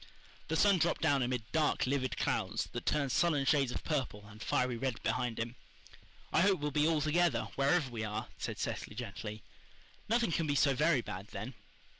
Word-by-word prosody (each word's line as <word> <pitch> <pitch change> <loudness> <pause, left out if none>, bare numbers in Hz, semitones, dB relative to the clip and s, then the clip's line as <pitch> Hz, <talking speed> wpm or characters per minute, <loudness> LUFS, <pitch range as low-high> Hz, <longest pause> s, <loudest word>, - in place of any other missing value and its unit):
The 160 - -1
sun 200 +2 +4
dropped 170 - +1
down 145 -4 +3
amid 125 -2 -1
dark, 155 -2 +2
livid 130 -1 -1
clouds, 105 +4 -1
that 120 - -6
turned 140 -3 +1
sullen 150 -2 +2
shades 135 -3 +3
of - - -4
purple 130 -9 -2
and 105 +1 -13
fiery 125 +1 +1
red 125 -1 -3
behind 120 0 -1
him. 115 +1 -3 0.8
"I - - +5
hope 195 -1 +4
we'll 150 0 -2
be 150 +2 +3
all 160 -2 +2
together, 155 -4 +2
wherever 140 0 +2
we 115 -2 -4
are," 110 0 -3
said - - -4
Cecily 105 - -4
gently. 110 -2 -6 0.7
"Nothing 230 -4 +2
can 165 -1 0
be 145 - +1
so 140 -1 +4
very 125 - +3
bad - - -7
then." - - -6
135 Hz, 190 wpm, -33 LUFS, 115-155 Hz, 0.8 s, I